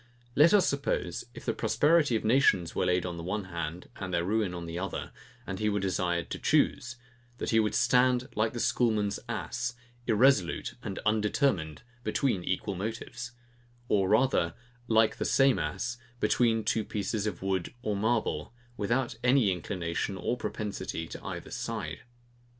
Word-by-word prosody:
Let 150 +4 +7
us 205 -3 +5
suppose, 140 -11 -1
if - - -10
the - - +1
prosperity 150 -4 +3
of 110 - -1
nations 110 -8 +3
were - - 0
laid 90 0 +2
on 85 -1 -4
the 85 - -6
one 100 +4 -2
hand, 85 -1 -5
and 95 -2 -5
their 85 -1 +1
ruin 105 -1 +1
on 85 -1 -5
the 85 +1 -4
other, 95 0 -4 0.3
and 95 -1 -5
he 105 - +1
were 105 0 0
desired 90 -2 -1
to - - -3
choose; 120 0 +2 0.4
that - - -2
he 110 - +5
would 105 -1 +1
stand 125 +1 +3
like 110 +1 0
the 120 - -4
schoolman's 110 -4 +1
ass, 120 0 -3 0.3
irresolute 110 -5 +3
and 95 - -5
undetermined, 105 - +1 0.2
between 125 -9 0
equal 95 +3 -1
motives; 115 +5 -5 0.6
or 95 -2 +3
rather, 110 -8 +3 0.3
like 110 -1 +3
the - - -1
same 135 -7 +4
ass 120 +10 -3 0.2
between 115 -3 +2
two 110 - +1
pieces 105 +1 -2
of 95 -3 -4
wood 95 -3 -1
or 105 -4 0
marble, 115 +3 0 0.2
without 120 +4 0
any 125 -5 +4
inclination 90 +1 -3
or 105 +6 -1
propensity 100 -8 -4
to - - -9
either - - -6
side. - - -4
105 Hz, 160 wpm, -29 LUFS, 90-120 Hz, 0.6 s, Let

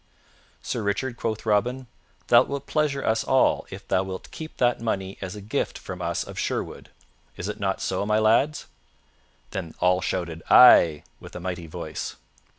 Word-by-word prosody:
"Sir 120 - -3
Richard," 105 +5 -1
quoth 110 -2 -3
Robin, 120 +5 +1 0.4
"thou - - +7
wilt 140 0 -4
pleasure 150 -3 0
us 110 0 +1
all 130 - +2
if - - -10
thou 95 - +2
wilt 95 -1 -7
keep 160 0 -9
that 120 -2 +2
money 95 -4 -2
as 95 +1 -5
a 105 - -8
gift 105 +2 -2
from - - -8
us - - -1
of - - -8
Sherwood. - - -3 0.5
Is 90 - -4
it 105 +1 -5
not 95 -1 -1
so, 95 - -1
my 105 +1 +1
lads?" 115 +8 +2 0.9
Then 90 -4 -5
all 90 0 +3
shouted 85 -3 -3
"Ay" 85 -11 +7 0.2
with - - -12
a - - -5
mighty 90 -2 -5
voice. 80 - -6
105 Hz, 170 wpm, -25 LUFS, 95-125 Hz, 0.9 s, thou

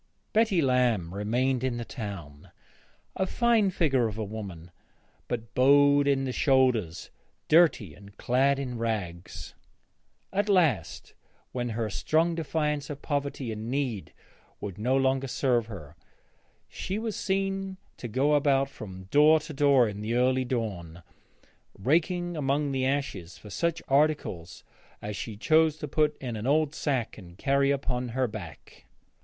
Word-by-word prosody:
Betty 215 -7 +3
Lamb 120 -10 +1
remained 120 +6 0
in 130 -2 -1
the 120 - -5
town, 95 - -8 0.7
a 190 - 0
fine 230 -2 +3
figure 135 -10 +1
of 105 -1 -6
a 110 - -2
woman, 100 -5 -7 0.6
but 115 -1 -5
bowed 145 +2 +5
in 135 -1 +2
the 130 - -2
shoulders, 125 - +1 0.4
dirty, 155 - +4
and 100 +2 -16
clad 135 +3 +2
in 125 -4 -4
rags. 90 -7 -4 0.8
At 205 +2 0
last, 140 - +1 0.4
when 120 -1 -3
her 115 0 -2
strong 165 - +1
defiance 150 -2 -2
of 145 -1 -7
poverty 140 -4 -2
and 110 +1 -5
need 130 -7 -2 0.5
would 100 -1 -7
no 125 +5 +2
longer 135 0 +1
serve 120 -3 +1
her, 85 -9 -10 0.7
she 195 - -4
was 220 -1 -3
seen 195 -1 -2 0.2
to 120 - -6
go 135 +6 +1
about 140 -2 +3
from 95 -6 -9
door 155 +2 +6
to 155 0 -8
door 140 -4 +4
in 105 -1 -6
the 110 +2 -2
early 130 +1 +2
dawn, 95 -9 -4 0.7
raking 175 - 0
among 145 0 0
the 130 -1 0
ashes 130 -11 -3
for 105 - -12
such 170 - -1
articles 135 - 0 0.4
as 105 0 -5
she 105 +2 -6
chose 155 +5 +3
to 150 - -5
put 150 +1 +1
in 125 -4 -5
an 110 +3 -4
old 150 +1 +2
sack 130 -8 -2
and 85 -2 -14
carry 140 +3 +2
upon 125 -3 -1
her 130 - +3
back. 100 -8 -10
130 Hz, 150 wpm, -27 LUFS, 110-150 Hz, 0.8 s, door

